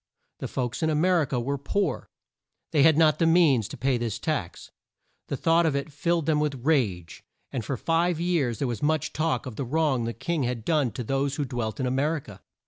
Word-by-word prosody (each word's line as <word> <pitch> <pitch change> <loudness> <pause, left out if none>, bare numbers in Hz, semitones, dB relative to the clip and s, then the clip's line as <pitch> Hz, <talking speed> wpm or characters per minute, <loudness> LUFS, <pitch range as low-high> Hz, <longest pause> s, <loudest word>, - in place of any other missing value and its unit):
The - - -4
folks 125 +1 -3
in 160 - +2
A 155 - +1
mer 175 +2 +3
i - - +1
ca 130 - -3
were 140 +4 -2
poor. 200 +8 -2 0.6
They 150 - +3
had 155 +1 +6
not 155 -2 +4
the 165 - +3
means 155 - +4
to - - -9
pay 130 +1 +1
this 115 -2 -2
tax. 125 - -4 0.6
The 140 - -3
thought 165 +2 +3
of 150 - 0
it 140 +2 -3
filled 170 +2 0
them 155 -2 +2
with 140 -4 -2
rage; 100 - 0 0.3
and 125 - -3
for 130 +4 -3
five 165 +4 +1
years 165 -10 0
there 135 - -1
was 120 -4 -4
much 155 -1 0
talk 150 -6 -1
of 125 -4 -7
the - - -2
wrong 135 -2 0
the 115 - -3
king 170 +3 -2
had 120 -3 -2
done 150 -6 +2
to 125 - -4
those 135 +3 -1
who 145 - -2
dwelt 120 -3 -4
in 130 - 0
A 125 - 0
mer 145 +5 +1
i - - -2
ca. 105 -8 -13
140 Hz, 235 wpm, -26 LUFS, 125-160 Hz, 0.6 s, had